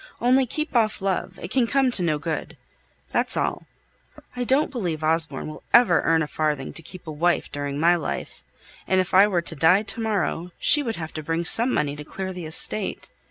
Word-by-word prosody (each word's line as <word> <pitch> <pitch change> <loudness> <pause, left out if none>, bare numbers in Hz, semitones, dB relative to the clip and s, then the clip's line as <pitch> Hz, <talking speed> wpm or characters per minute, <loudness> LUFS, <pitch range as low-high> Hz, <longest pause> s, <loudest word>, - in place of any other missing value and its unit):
Only 255 +2 +3
keep 305 +2 -4
off 220 -2 +2
love; 195 -2 -2
it 175 - -7
can 255 -3 +2
come 270 0 +2
to 200 - +1
no 160 -4 +1
good. 155 0 -5 0.5
That's - - +1
all. - - -2 0.7
I 245 - -2
don't 270 +5 +2
believe 175 - -3
Osborne 160 +1 0
will 155 - -9
ever 235 -9 +5
earn 165 -1 +2
a - - -4
farthing 150 -3 -2
to - - -6
keep 180 +3 -11
a 160 - -6
wife 170 +4 0
during 145 0 -4
my 170 +3 +4
life, 165 - -5 0.4
and 190 - +2
if 185 - -2
I 195 +2 +7
were 180 -4 0
to 165 - +2
die 165 +7 +4
to 225 - -1
morrow, 190 -5 -2
she 295 - +4
would 230 -5 -3
have 160 -1 -7
to 155 - -5
bring 165 +2 -2
some 235 +8 +4
money 145 - -1
to 150 - -8
clear 190 +5 -6
the 180 -2 -7
estate. 190 +5 0
175 Hz, 210 wpm, -23 LUFS, 160-225 Hz, 0.7 s, I